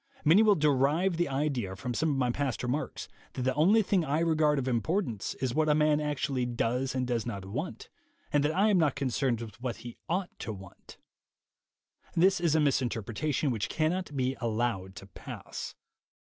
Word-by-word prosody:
Many 165 +8 +7
will 215 -2 +5
derive 150 +4 +2
the 175 -3 +1
idea 135 -8 -1
from 120 +5 -4
some 160 +6 +1
of 140 - 0
my 125 -2 +1
past 135 -1 -2
remarks 130 +5 -3 0.3
that 130 - -3
the 130 +1 +1
only 190 +10 +4
thing 190 -3 +2
I 155 +1 0
regard 155 -3 +3
of 135 -1 -1
importance 125 - -1
is 130 -2 -2
what 155 +2 +2
a 150 - +5
man 150 -1 +3
actually 145 -3 -1
does 125 +2 -1
and 130 -1 0
does 120 -3 -1
not 100 -5 -5
want, 125 - -5 0.5
and 145 -1 +4
that 150 +2 +1
I 205 +4 +4
am 190 - +4
not 150 -5 +2
concerned 130 -3 0
with 115 +1 -9
what 125 -2 -2
he 120 +1 -10
ought 180 +2 -1
to 110 - -4
want. 95 -2 -13 1.2
This 185 +2 +4
is 165 -3 +2
a - - +4
misinter 130 -6 +1
pretation 140 +6 -1
which 110 -4 -2
cannot 160 -1 -1
be 130 0 0
allowed 110 -5 -1
to 95 - -9
pass. 95 - -8
135 Hz, 190 wpm, -29 LUFS, 120-155 Hz, 1.2 s, Many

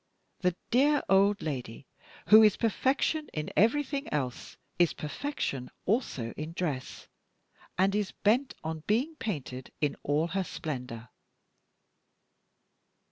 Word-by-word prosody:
The 180 -2 +1 0.2
dear 285 +4 +4
old 200 +1 +4
lady, 130 -4 -5 0.4
who 215 +1 +10
is 215 -2 +5
perfection 270 +7 +1
in 155 0 -3
everything 280 +6 +2
else, 130 -5 -3 0.2
is 175 -2 +4
perfection 150 - -4 0.2
also 180 - -1
in 155 +2 -6
dress, 150 -8 -4 0.7
and 190 +2 +3
is 205 -2 0
bent 245 +6 +1
on 160 0 -3
being 250 +10 +1
painted 135 - -5
in 145 -2 0
all 150 +4 +1
her 195 +3 0
splendor." 125 -9 -6
180 Hz, 115 wpm, -29 LUFS, 145-230 Hz, 0.7 s, who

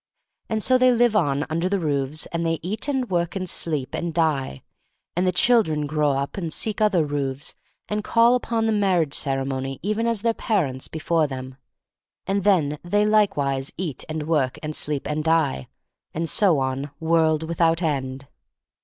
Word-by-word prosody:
And 220 -1 0
so 255 -1 +4
they 255 0 +5
live 240 -2 +3
on 145 -6 +1
under 165 +3 -1
the 200 0 0
roofs, 145 -1 0
and 170 0 -2
they 165 0 0
eat 210 - -2
and 265 -3 0
work 170 -1 0
and 185 -1 -3
sleep 150 -6 -2
and 170 - -2
die; 145 - 0 0.5
and 180 +2 +1
the - - +3
children 180 -7 +3
grow 150 -1 +1
up 140 +5 -3
and 170 -4 -3
seek 215 +6 -1
other 195 -7 +3
roofs, 140 -1 -3 0.3
and 210 0 -2
call 230 +2 +4
upon 230 -2 0
the 225 - +2
marriage 185 -8 +1
ceremony 135 -1 -1
even 215 +3 0
as 230 -3 0
their 230 -1 +2
parents 150 - -1
before 160 0 0
them 130 -1 -7 0.4
— - - -69
and 195 0 0
then 155 -8 +2
they 205 +4 +2
likewise 145 -11 +1
eat 165 -7 -4
and 155 -1 -3
work 150 -5 0
and 155 0 -4
sleep 145 -2 -2
and 150 +1 -2
die; 160 - +1 0.5
and 165 +1 -1
so 180 -2 +3
on 135 +1 -2
world 160 -1 +2
without 165 +1 +1
end. 135 -3 -2
165 Hz, 180 wpm, -23 LUFS, 145-200 Hz, 0.5 s, they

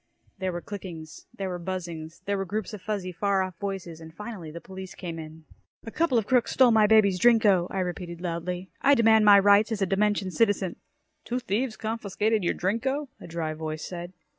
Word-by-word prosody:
There 190 -1 -1
were 175 0 -5
clickings, 165 -7 -9
there 195 - -5
were 180 -1 -4
buzzings, 170 -2 -6
there 200 - 0
were 195 - -1
groups 210 +3 -4
of 210 - -7
fuzzy, 200 -3 -3
far 195 +2 +1
off 185 -2 -6
voices, 190 -5 -5
and 160 0 -10
finally 200 -2 -8
the 165 +2 -8
police 190 +1 -9
came 170 -3 -6
in. 160 0 -10 0.4
"A 225 - -6
couple 310 -4 +1
of 220 - +1
crooks 250 +1 +2
stole 255 -2 +6
my 215 -2 +5
baby's 205 -4 +4
Drinko!" 210 -6 +4
I 190 - -2
repeated 175 -1 -5
loudly. 180 +1 -4
"I 280 +1 +5
demand 220 -2 +5
my 205 -1 +9
rights 205 +3 +5
as 210 -3 0
a - - +3
dimension 200 0 +1
citizen!" 200 -4 +1 0.5
"Two 245 - -2
thieves 235 0 -2
confiscated 215 -1 -1
your 175 - +1
Drinko," 260 +9 -1
a - - -10
dry 165 -2 -3
voice 155 0 -5
said. 175 0 -7
195 Hz, 200 wpm, -27 LUFS, 175-215 Hz, 0.5 s, my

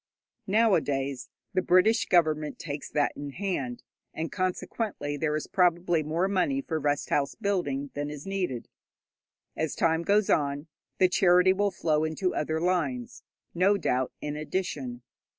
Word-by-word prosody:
Nowadays, 145 - +1 0.2
the 185 - +2
British 185 +5 +4
Government 155 -4 +2
takes 145 -2 -6
that 145 -1 +1
in 145 -1 -6
hand, 155 -10 -3 0.3
and 160 +1 -3
consequently 185 -4 -2
there 150 +1 -1
is 155 - -2
probably 175 -2 +2
more 160 +5 0
money 200 +8 +1
for 165 - -3
rest 145 -1 -1
house 140 -1 +1
building 145 -9 -1
than 145 0 -3
is 150 -1 -8
needed. 185 -11 -3 0.9
As 160 -2 -2
time 160 0 +2
goes 205 +3 +2
on, 145 0 +1 0.3
the 185 - +5
charity 180 0 +5
will 200 +1 +1
flow 155 -4 0
into 160 +4 -1
other 155 +1 -1
lines, 160 -9 -1 0.3
no 195 +4 +3
doubt, 130 -8 0
in 150 0 -3
addition. 150 -7 -4
160 Hz, 145 wpm, -28 LUFS, 145-185 Hz, 0.9 s, the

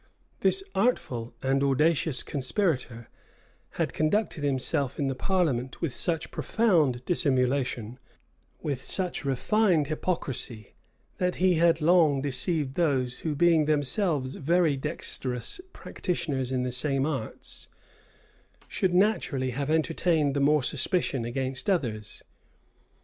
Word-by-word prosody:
This 385 - +2
artful 125 - -1
and 135 +1 +1
audacious 145 0 +2
conspirator 130 - -1 0.7
had - - -2
conducted 160 0 0
himself 140 0 0
in 145 - -1
the 135 - 0
parliament 135 -5 -1
with 165 -7 -2
such 165 -2 -2
profound 155 - +1
dissimulation, 130 -6 0 0.6
with 140 -4 -3
such 185 -2 +1
refined 160 - +2
hypocrisy, 135 - -3 0.5
that 180 0 0
he 185 0 +3
had 165 0 +3
long 160 -4 +4
deceived 140 +1 0
those 135 -6 0
who, 155 -2 -2
being 165 0 +4
themselves 150 -1 +1
very 165 0 +2
dexterous 130 - -3
practitioners 140 - -3
in 130 -1 0
the 125 - -2
same 135 +2 +1
arts, 135 -8 -4 1.0
should 185 -2 0
naturally 170 -10 +1
have 140 +3 -3
entertained 160 -2 +1
the - - +1
more 145 0 +3
suspicion 135 -3 0
against 130 +5 -2
others. 115 - -2
145 Hz, 115 wpm, -27 LUFS, 130-170 Hz, 1.0 s, long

